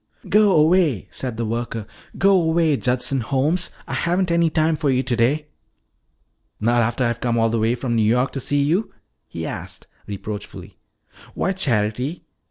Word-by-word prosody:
"Go 210 -2 +5
away," 155 - +3
said 125 -4 -4
the 115 - -2
worker, 115 -1 -3 0.3
"go 195 +1 +4
away, 165 -4 +3
Judson 130 +1 0
Holmes. 145 +9 0 0.2
I - - -5
haven't 175 +1 0
any 170 -1 +3
time 155 +1 +1
for 150 -2 -1
you 130 0 +2
today." 130 +4 +1 1.1
"Not 120 +2 +2
after 120 +3 0
I've 120 -1 -1
come 120 -1 0
all 115 0 +3
the 115 - 0
way 115 +2 +1
from 125 -1 -3
New 115 - +2
York 125 +5 +2
to 135 - -3
see 140 +2 +1
you?" 175 +9 0 0.4
he - - -6
asked - - -6 0.2
reproachfully. 105 +1 -7 0.6
"Why, 190 - 0
Charity!" 125 - -1
130 Hz, 165 wpm, -21 LUFS, 115-165 Hz, 1.1 s, Go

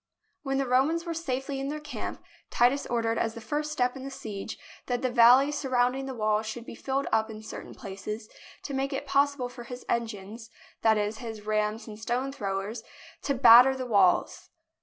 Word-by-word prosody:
When 270 -1 -1
the 275 - +1
Romans 275 +7 +2
were 335 - -3
safely 270 -4 -3
in 270 - -3
their 300 +2 -3
camp, 300 -1 -6 0.3
Titus 250 +4 +2
ordered 230 -1 0
as 225 0 -1
the - - -6
first 300 +6 -3
step 250 -3 0
in 265 - -8
the 275 - -5
siege 220 -6 -6 0.3
that 245 0 -1
the 255 - +1
valley 245 +4 +6
surrounding 265 -2 0
the 265 - -5
walls 215 -1 0
should 230 +2 -6
be - - -8
filled 270 +3 -2
up 220 0 +2
in 215 0 -9
certain - - -8
places, 210 +2 -7 0.4
to 280 - -5
make 270 +1 -1
it 270 - -3
possible 280 -2 +1
for 245 -1 -10
his 250 -1 -9
engines 225 -1 -4 0.2
— - - -27
that 220 -1 +4
is, 210 +1 -2
his 225 -3 -7
rams 215 +1 -1
and 215 -1 -10
stone 250 +4 -2
throwers 200 -2 -4 0.2
— - - -20
to 280 - +1
batter 250 +1 +8
the 260 -1 -4
walls. 200 -6 +2
245 Hz, 200 wpm, -28 LUFS, 220-270 Hz, 0.4 s, batter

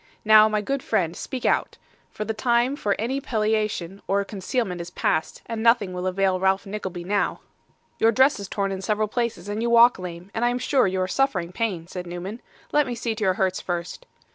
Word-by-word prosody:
Now, 215 0 +7
my 215 -1 0
good 275 +5 -2
friend, 170 -7 0
speak 255 +5 -5
out; - - +1 0.3
for 215 - -5
the 220 - -2
time 240 +3 +1
for 205 -8 0
any 260 +5 -2
palliation 215 -5 -1
or 200 +1 +1
concealment 195 -2 -3
is 170 - -7
past, 160 -3 -1
and 225 -1 -4
nothing 225 -5 +3
will 180 +1 -3
avail 185 0 +1
Ralph 190 +1 +1
Nickleby 190 -3 -5
now.' 200 +3 -1 0.6
'Your 225 - +5
dress 260 +1 +4
is 200 - -6
torn 195 0 -2
in 190 -1 -4
several 215 +1 0
places; 225 -5 -2
you 220 +3 -1
walk 235 -2 +6
lame, 180 +1 -8
and 225 - -2
I 240 - +4
am 245 - -1
sure 255 -2 +2
you 190 0 -1
are 185 - 0
suffering 185 -8 0
pain,' 185 -4 -2
said 180 0 -7
Newman. 180 +6 -6 0.3
'Let 295 -2 +3
me 245 - -3
see 230 -1 -2
to 215 - -4
your 185 -2 +2
hurts 190 -1 0
first. 175 - -5
205 Hz, 210 wpm, -24 LUFS, 185-235 Hz, 0.6 s, Now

